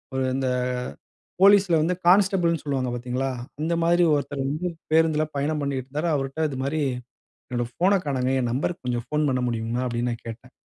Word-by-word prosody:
ஒரு 130 - 0
இந்த 135 -1 -1 0.9
போலீஸ்ல 195 -3 +6
வந்து 180 +3 +1
கான்ஸ்டபிள்ன்னு 180 -4 +4
சொல்லுவாங்க, 130 -3 -1
பாத்தீங்களா. 125 +2 -2 0.3
அந்த 165 +2 0
மாரி 175 +1 +4
ஒருத்தர் 140 -1 -2
வந்து 155 +6 -2 0.2
பேருந்தில 160 -1 +3
பயணம் 150 +2 0
பண்ணிட்டு 135 -2 -2
இருந்தாரு. 150 +5 -2
அவருட்ட 140 +3 -1
இது 135 - -6
மாரி, 150 +3 -1 0.7
"என்னோட 120 -1 -1
ஃபோன 190 +3 +2
காணோங்க. 130 -2 0
என் 120 - -1
நம்பர்ருக்கு 135 +2 -2
கொஞ்சம் 120 0 -2
ஃபோன் 150 0 0
பண்ண 130 -1 0
முடியுமா?" 115 +1 -2
அப்படின்னு 120 0 -1
நான் 115 - -10
கேட்டேன். 125 +3 -9
140 Hz, 170 wpm, -24 LUFS, 125-165 Hz, 0.9 s, போலீஸ்ல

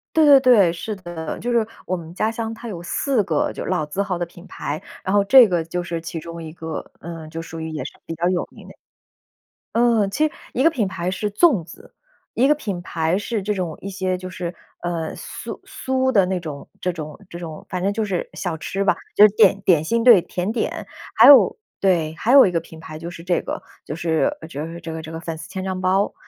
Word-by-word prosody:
对 315 -1 +6
对 285 -2 +9
对， 235 -9 +6
是 210 +5 -4
的， 175 -4 -6
就 245 - -3
是 235 -2 +2 0.2
我 185 - -1
们 165 -1 -9
家 215 +4 0
乡 225 0 -4
它 230 +1 -8
有 175 -6 -6
4 230 +5 0
个 155 -5 0
就 - - -5
老 155 - -1
字 170 +7 -2
号 190 -3 -2
的 175 - -2
品 175 +2 -15
牌， 150 +2 -5 0.2
然 190 - -2
后 200 -1 +4
这 250 +2 +8
个 175 -3 0
就 175 +2 -3
是 170 -1 -4
其 165 0 -5
中 170 +1 -8
一 155 - -8
个， 160 -1 -7
呃， 165 -2 -8
就 165 +1 -6
属 165 0 -8
于 160 0 -4
也 155 -1 -4
是 - - -8
比 165 - -5
较 170 +2 +1
有 180 -1 0
名 - - -14
的。 - - -12 1.0
嗯， 230 -4 +3
其 300 +9 +2
实 305 - -5 0.2
一 255 - +1
个 330 - +6
品 230 - -1
牌 185 -1 -3
是 205 +3 -2
粽 230 - +4
子， 395 - -15 0.4
一 260 +3 +3
个 300 - +5
品 205 -11 -4
牌 170 0 -1
是 210 0 -3
这 210 +2 -1
种 180 -6 -3
一 195 - -5
些 185 -1 -1
就 185 0 -8
是， 175 -1 -5 0.3
呃， 170 -2 -3
酥 - - -7
酥 260 -9 0
的 205 -7 +4
那 185 0 -1
种 150 -4 -7
这 180 - 0
种 155 -3 -7
这 170 - -8
种， 160 -3 -8
反 180 -1 -3
正 200 +2 +1
就 220 +2 -1
是 195 -4 -2
小 175 -4 -3
吃 195 +5 -3
吧， 200 - +3 0.2
就 210 - +9
是 200 - -10
点 200 -2 +5
点 170 -5 +4
心， 230 +8 +1
对， 230 -7 +8
甜 180 +4 -3
点。 235 - -3 0.3
还 - - +9
有 285 - +8 0.2
对， 170 -5 +2
还 235 - +1
有 275 -3 +9
一 - - +1
个 170 - +1
品 160 -1 -13
牌 155 -1 -9
就 170 +2 -6
是 170 -1 -10
这 175 0 0
个， - - -5 0.2
就 - - -5
是 170 - +1
就 150 -2 -5
是 170 +1 -8
这 165 0 -7
个 160 0 -5
这 160 +1 -8
个 165 - -5
粉 165 -1 -5
丝 160 +1 -10
千 190 0 -4
张 190 -1 -3
包。 190 +2 +2
180 Hz, 260 characters per minute, -22 LUFS, 165-215 Hz, 1.0 s, 对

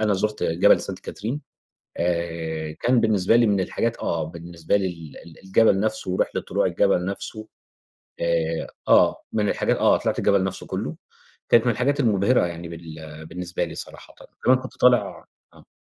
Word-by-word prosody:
أنا 105 -1 +2
زُرت 105 +2 -2
جبل 80 +1 +4
سانت - - -5
كاترين، 120 +8 -5 0.6
آآ، 85 -2 -2
كان 120 0 +3
بالنسبة 110 -1 +3
لي 120 -1 +4
من 100 -2 +2
الحاجات 115 +5 -1
آه، 80 -2 -1
بالنسبة 85 +2 -3
لي 100 - 0
ال 85 -4 -8
ال 85 +3 -14
الجبل 95 0 +4
نفسه 110 -3 -1
ورحلة 90 - 0
طلوع - - 0
الجبل 90 - +2
نفسه 110 +3 -5 0.7
آآ، 85 -1 0 0.2
آه - - +4
من 105 -2 +1
الحاجات - - 0
آه - - +4
طِلِعت - - -1
الجبل 100 -1 +3
نفسه 95 0 -4
كلُه - - -4 0.5
كانت 120 +1 +5
من 120 - +4
الحاجات 140 +6 0
المُبهرة 110 -2 +3
يعني 85 0 -7
بال 80 -2 -10
بالنسبة 90 +1 -4
لي - - -6
صراحةً، - - -7 0.3
كمان 130 0 +6
كنت 130 0 -10
طالع 125 -1 +3 0.3
آه. - - -19
95 Hz, 165 wpm, -23 LUFS, 85-110 Hz, 0.7 s, كمان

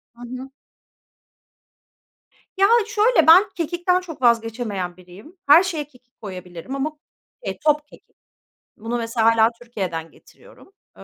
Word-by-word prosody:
Hı 240 - -17
hı. 255 +2 -8 2.1
Ya 395 +1 +5 0.2
şöyle; 420 -5 +3
ben 375 +6 +7
kekikten 350 +2 0
çok 325 -7 -10
vazgeçemeyen 225 -6 0
biriyim. 190 - -16
Her 320 +6 +8
şeye 315 -6 -4
kekik 250 -4 -26
koyabilirim 185 +4 -8
ama 290 +3 -2 0.5
eee, - - -4
top 300 0 +2
kekik. - - -20 0.6
Bunu 230 +3 -4
mesela 230 -1 -1
hâlâ 225 0 +5
Türkiye'den 185 -9 -5
getiriyorum. - - -20 0.3
Eee, - - -12
245 Hz, 125 wpm, -21 LUFS, 220-325 Hz, 2.1 s, Her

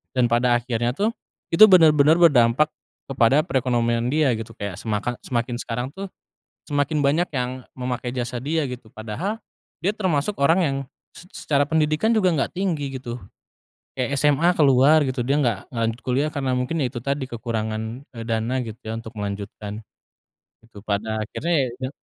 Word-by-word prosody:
dan 125 -2 +3
pada 120 +1 +3
akhirnya 120 0 -1
tuh 210 +6 +1 0.4
itu 190 +6 +10
benar-benar 160 -3 +6
berdampak 140 -1 +5 0.4
kepada 135 +2 +4
perekonomian 120 -4 0
dia 155 -2 +3
gitu 110 - -7
kayak 100 -4 -5
semakan 115 +2 -3
semakin 120 -1 -2
sekarang 125 +2 -3
tuh, 195 +1 -6 0.6
semakin 145 +1 0
banyak 155 +6 +2
yang 125 0 -3
memakai 125 -1 -3
jasa 120 0 -3
dia 155 +4 -1
gitu 125 -3 -7
padahal 115 - -4 0.5
dia 200 - +2
termasuk 190 -2 -1
orang 165 +6 +4
yang 135 -3 0 0.4
se 180 - -13
se - - -9
secara 145 -1 +3
pendidikan 160 +7 +2
juga 195 -4 +3
enggak 145 - -1
tinggi 150 -8 -2
gitu, 120 -1 -6 0.8
kayak 135 +2 -1
SMA 150 +3 +3
keluar 145 +1 +5
gitu 130 -2 -2
dia 135 +4 +1
enggak 120 -9 0
enggak 115 -3 -3
lanjut 115 +2 -2
kuliah 135 +4 0
karena 135 -2 -1
mungkin 125 +6 -1
ya 135 - +1
itu 120 -1 -7
tadi 140 0 -1
kekurangan, 110 -2 -3 0.3
eee, 115 - -6
dana 115 +2 -1
gitu 110 0 -9
ya 110 - -4
untuk 115 0 -8
melanjutkan, 105 +1 -5 0.9
gitu 105 -3 -14
pada 110 +1 -2
akhirnya, 170 +10 -2
ya - - 0
itu 130 0 -4
130 Hz, 170 wpm, -23 LUFS, 115-150 Hz, 0.9 s, itu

